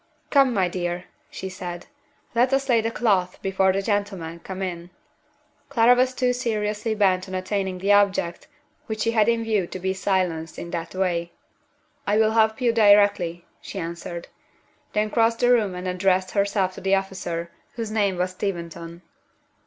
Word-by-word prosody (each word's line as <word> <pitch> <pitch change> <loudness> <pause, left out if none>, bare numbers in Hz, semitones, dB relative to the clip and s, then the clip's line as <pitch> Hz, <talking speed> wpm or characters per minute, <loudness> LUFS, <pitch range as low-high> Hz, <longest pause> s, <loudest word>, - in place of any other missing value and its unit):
"Come, 275 -3 +5
my 195 -6 +2
dear," 175 0 -3 0.3
she 190 - -6
said. 180 -2 -7 0.5
"Let 245 +2 +3
us 270 0 +1
lay 235 -3 +4
the 225 - -1
cloth 195 -6 +1
before 190 0 +2
the 195 +1 -1
gentlemen 195 -6 -2
come 190 +2 -6
in." 175 -2 -5 0.8
Clara 240 -3 +5
was 255 +1 +2
too 250 -1 +1
seriously 215 -2 -1
bent 190 -3 +2
on 185 - -4
attaining 190 0 -2
the 195 +3 +1
object 200 - +2 0.4
which 220 -1 -4
she 230 - +2
had 220 -1 +3
in 230 -1 +1
view 215 -5 0
to - - -6
be 190 +1 -1
silenced 185 -4 -1
in 170 - -7
that 170 +1 -5
way. 175 -2 -1 0.7
"I 205 +1 +3
will 220 0 +4
help 220 0 +3
you 240 -2 +2
directly," 205 -5 +4 0.2
she - - -8
answered 170 +1 -5 0.7
then 210 0 0
crossed 230 0 +3
the 245 0 +4
room 210 -6 +2
and 180 +1 -5
addressed 185 0 +1
herself 200 -2 +1
to - - -10
the 195 +1 +3
officer, 175 -3 -3 0.2
whose 225 -2 -4
name 200 -4 +1
was 180 +1 0
Steventon. 170 -2 -5
195 Hz, 170 wpm, -24 LUFS, 180-220 Hz, 0.8 s, Come